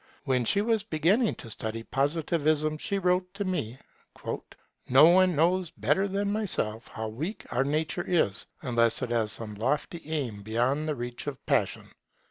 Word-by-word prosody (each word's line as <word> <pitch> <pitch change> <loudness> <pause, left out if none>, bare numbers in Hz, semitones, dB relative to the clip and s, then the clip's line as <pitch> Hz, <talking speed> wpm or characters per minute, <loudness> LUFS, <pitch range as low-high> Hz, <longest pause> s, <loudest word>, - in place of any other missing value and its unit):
When 130 -3 +1
she 200 - +3
was 225 0 +1
beginning 200 +5 +1
to 115 - -9
study 110 +2 -4
Positivism 155 +2 0
she 200 +4 -1
wrote 180 -1 +1
to 200 0 -3
me: 130 - -2 1.1
'No 135 +4 +8
one 180 +1 +5
knows 175 +3 +2
better 145 - 0
than 200 +1 -1
myself 120 - -1
how 110 -1 -5
weak 150 - -5
our 125 +2 +2
nature 155 +5 -1
is 115 - +4 0.2
unless 120 -2 +2
it 120 - -3
has 110 -3 +1
some 105 +1 -5
lofty 135 +9 -2
aim 130 -10 -2
beyond 120 +8 0
the 155 - -1
reach 120 +2 -5
of 140 -3 -6
passion'. - - 0
150 Hz, 160 wpm, -28 LUFS, 120-180 Hz, 1.1 s, No